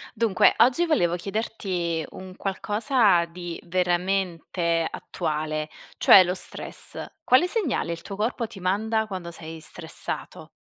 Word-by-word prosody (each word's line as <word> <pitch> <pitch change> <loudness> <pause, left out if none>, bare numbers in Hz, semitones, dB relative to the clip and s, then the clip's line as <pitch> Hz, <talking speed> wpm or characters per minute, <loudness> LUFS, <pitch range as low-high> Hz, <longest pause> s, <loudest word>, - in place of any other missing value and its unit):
Dunque, 220 -4 +4
oggi 260 +8 +4
volevo 175 - +1
chiederti 185 -4 -3
un 185 0 -10
qualcosa 205 -1 +2
di 170 0 -7
veramente 175 -1 0
attuale, 155 -2 -4 0.3
cioè 190 - +8
lo 180 +1 -1
stress. - - 0 0.2
Quale 255 +8 +5
segnale 355 - 0
il 170 - -6
tuo 195 -1 -7
corpo 230 +3 -1
ti 210 -3 -12
manda 220 +4 0
quando 185 -4 -6
sei 165 -1 -9
stressato? - - -2
185 Hz, 125 wpm, -25 LUFS, 170-220 Hz, 0.3 s, cioè